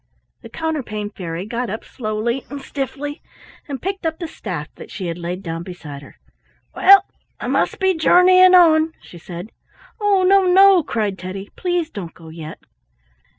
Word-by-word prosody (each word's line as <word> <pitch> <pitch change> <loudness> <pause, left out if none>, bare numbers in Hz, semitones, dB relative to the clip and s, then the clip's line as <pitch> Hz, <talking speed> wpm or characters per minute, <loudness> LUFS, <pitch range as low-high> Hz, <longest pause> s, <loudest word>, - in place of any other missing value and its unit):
The - - -11
Counterpane 255 -11 -4
Fairy 175 -3 -6
got 235 +2 -3
up 220 +3 -5
slowly 235 +2 -3
and 285 +2 -6
stiffly, 280 +2 -5 0.5
and 275 -3 -5
picked 385 +1 -3
up 320 -1 -2
the 340 - -5
staff 180 - -6
that - - -12
she 190 0 -6
had 170 0 -4
laid 175 +2 -5
down 165 -1 -4
beside 165 -6 -9
her. 140 - -15 0.6
"Well, 395 +1 +7 0.3
I - - -6
must - - 0
be 380 -1 +3
journeying 365 +2 +6
on," 320 -2 +5
she 175 - -13
said. 175 +5 -9 0.5
"Oh, 400 -2 +3
no, 385 0 +5
no!" 385 0 +7
cried 210 -9 -2
Teddy. 190 +2 -7
"Please 350 -3 -1
don't 180 -5 -7
go 165 -1 -13
yet." 160 0 -9
240 Hz, 165 wpm, -20 LUFS, -, 0.6 s, Well